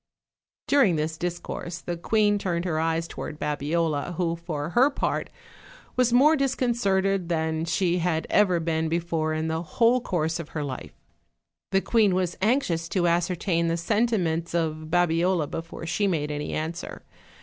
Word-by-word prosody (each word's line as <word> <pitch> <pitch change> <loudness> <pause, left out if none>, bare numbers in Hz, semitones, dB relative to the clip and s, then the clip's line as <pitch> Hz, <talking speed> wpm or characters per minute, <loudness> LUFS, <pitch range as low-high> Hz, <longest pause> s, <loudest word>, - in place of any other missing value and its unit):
During 270 - +4
this 155 +1 -1
discourse 175 0 -4
the 175 0 -4
queen 205 +3 +2
turned 175 -2 -2
her 160 -3 0
eyes 165 +1 0
to - - -11
ward 150 - -5
Babiola, 150 +2 -1
who 170 -1 0
for 160 -3 -4
her 255 +7 +5
part 280 - -2 0.7
was 250 -1 +3
more 280 +6 +6
disconcerted 195 - +1
than 160 -1 0
she 175 +1 +1
had 165 -2 0
ever 185 -4 +3
been 160 -1 -1
before 165 -2 -1
in 160 +1 -1
the 160 0 -1
whole 235 +8 +2
course 165 -6 -1
of 165 - -7
her 150 - -1
life. 130 - -6 0.8
The 195 0 +3
queen 210 -5 +3
was 185 -1 0
anxious 190 -8 +1
to 180 -3 +1
ascertain 170 0 +1
the 165 0 0
sentiments 175 -4 0
of 155 -2 -1
Babiola 175 0 +2
before 165 +2 -7
she 200 +5 0
made 150 -5 -1
any 150 0 -3
answer. 165 +2 -4
170 Hz, 160 wpm, -26 LUFS, 160-195 Hz, 0.8 s, more